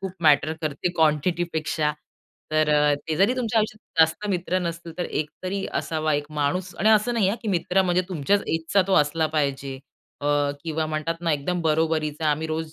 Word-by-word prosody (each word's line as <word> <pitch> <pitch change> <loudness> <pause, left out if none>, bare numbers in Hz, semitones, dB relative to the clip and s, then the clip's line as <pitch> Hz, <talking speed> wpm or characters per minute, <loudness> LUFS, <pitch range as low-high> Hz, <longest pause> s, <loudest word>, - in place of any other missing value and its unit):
खूप 190 -2 -4
मॅटर 155 0 +4
करते 155 +3 -1
क्वांटिटी 160 +2 +2
पेक्षा 155 -1 0 0.6
तर, 155 0 +2 0.3
ते 150 +2 -4
जरी 200 +8 +3
तुमच्या 230 -2 +1
आयुष्यात 215 -5 -2
जास्त 165 +6 +3
मित्र 185 0 0
नसतील 170 -1 -5
तर 175 - 0
एक 150 -1 -2
तरी 195 +1 -2
असावा 155 -1 -1
एक 145 0 -1
माणूस 150 +6 -1
आणि 215 - +3
असं 220 +2 +4
नाही 200 -5 +2
हां 215 - 0
की 220 - -3
मित्र 190 +1 +2
म्हणजे 180 0 +2
तुमच्याच 185 +4 +1
एजचा 165 +4 +1
तो 195 - +2
असला 155 +1 +2
पाहिजे 140 -2 -1 0.5
अ, 145 - -3 0.4
किंवा 160 -1 -1
म्हणतात 155 +2 -2
ना, 165 -2 +1
एकदम 170 +5 -1
बरोबरीचा, 155 -1 0
आम्ही 155 +2 -1
रोज 160 0 -4
160 Hz, 185 wpm, -24 LUFS, 155-185 Hz, 0.6 s, मॅटर